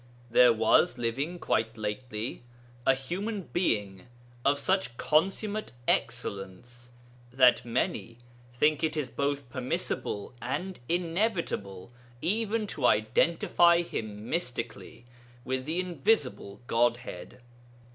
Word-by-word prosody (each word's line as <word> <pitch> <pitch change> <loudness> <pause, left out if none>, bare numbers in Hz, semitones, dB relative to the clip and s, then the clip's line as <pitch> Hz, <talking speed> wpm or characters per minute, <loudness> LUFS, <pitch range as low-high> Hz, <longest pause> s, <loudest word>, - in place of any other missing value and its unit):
There 125 +1 +7
was 115 +2 +3
living 135 +9 -2
quite 110 -8 -1
lately 110 +1 -4 0.5
a 135 - +6
human 190 +10 -4
being 105 - 0 0.4
of 140 +1 +3
such 185 -4 0
consummate 195 - 0
excellence 120 +2 -2 0.4
that 125 -1 +5
many 115 -1 -2 0.3
think 150 +6 +2
it 160 0 0
is 140 -4 -1
both 140 +2 -2
permissible 125 -3 -3
and 180 +10 -3
inevitable 170 - -1 0.3
even 215 - 0
to 140 -10 0
identify 170 +10 +4
him 110 -8 -6
mystically 120 -7 -4 0.4
with 130 0 -2
the 160 +4 -1
invisible 155 - 0
Godhead. 120 +2 -1
130 Hz, 100 wpm, -29 LUFS, 115-170 Hz, 0.5 s, There